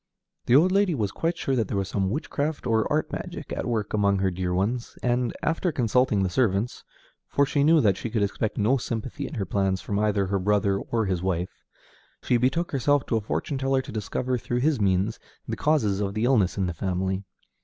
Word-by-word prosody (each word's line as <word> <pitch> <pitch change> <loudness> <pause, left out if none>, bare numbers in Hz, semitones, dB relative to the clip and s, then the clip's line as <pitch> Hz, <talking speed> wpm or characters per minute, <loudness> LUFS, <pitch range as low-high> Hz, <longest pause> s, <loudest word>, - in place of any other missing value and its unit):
The 120 - +5
old 170 +6 +5
lady 195 -3 +3
was 105 -6 -1
quite 165 +7 -1
sure 135 -4 -1
that 115 -5 0
there 100 - -2
was 95 -1 -1
some 95 -1 -1
witchcraft 150 +4 -2
or 110 -2 +1
art - - 0
magic - - -6
at - - -3
work 110 -4 -2
among 100 -2 +2
her 95 0 +1
dear 90 0 -2
ones, 105 +7 -1
and, 120 -1 +1
after 165 +2 0
consulting 125 -5 +2
the - - +1
servants 110 0 0 0.4
(for 140 - +2
she 140 0 +1
knew 160 +1 +5
that 100 -4 +3
she 115 - -4
could 110 -2 0
expect 105 +2 -2
no 110 +6 +3
sympathy 120 +3 -4
in 155 - -8
her 100 -5 -2
plans 95 0 0
from 100 +2 -2
either 105 -2 +1
her 100 +1 0
brother 100 0 +1
or 115 +1 -1
his 95 -3 -1
wife), 90 -1 -1 0.7
she 125 - +2
betook 135 +8 0
herself 140 +1 +2
to - - -1
a - - -1
fortune 135 +6 -3
teller 135 0 +1
to - - -9
discover 125 +4 -2
through 120 +3 -2
his 145 -4 +2
means 95 +2 +1 0.3
the - - -2
causes 110 -11 +1
of 100 0 -2
the 110 - -1
illness 115 -8 +2
in 95 - +1
the 90 - -2
family. 95 +2 -2
110 Hz, 220 wpm, -26 LUFS, 100-130 Hz, 0.7 s, The